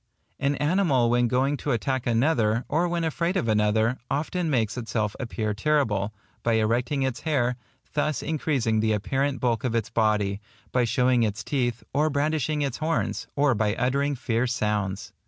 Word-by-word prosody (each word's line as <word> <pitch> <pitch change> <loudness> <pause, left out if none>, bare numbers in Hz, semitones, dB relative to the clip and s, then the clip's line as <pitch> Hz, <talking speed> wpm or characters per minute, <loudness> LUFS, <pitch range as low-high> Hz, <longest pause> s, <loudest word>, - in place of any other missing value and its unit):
An 140 +1 +1
animal 145 -6 +2
when 120 0 +3
going 130 +4 +1
to 145 - -1
attack 130 +2 -1
another, 115 -2 +2
or 170 +4 +1
when 170 -1 -1
afraid 170 +3 0
of 115 - -1
another, 110 +3 +2
often 165 +4 -1
makes 115 -6 +1
itself 110 -3 -2
appear 110 -4 -2
terrible, 105 -5 +1 0.3
by 115 - +1
erecting 120 +5 +1
its 130 -2 -1
hair, 125 -6 0 0.4
thus 150 0 0
increasing 135 -8 0
the 110 0 +2
apparent 135 +6 -1
bulk 115 -3 0
of 120 -3 -1
its 115 0 -1
body, 105 -3 +1 0.3
by 125 -1 +2
showing 125 +1 +2
its 110 -2 -1
teeth, 120 -4 -1
or 150 +3 +2
brandishing 150 0 0
its 135 -3 -2
horns, 160 +1 -1
or 140 -2 +3
by 105 -1 0
uttering 140 +3 0
fierce 120 0 0
sounds. 105 -2 -2
125 Hz, 165 wpm, -26 LUFS, 110-145 Hz, 0.4 s, when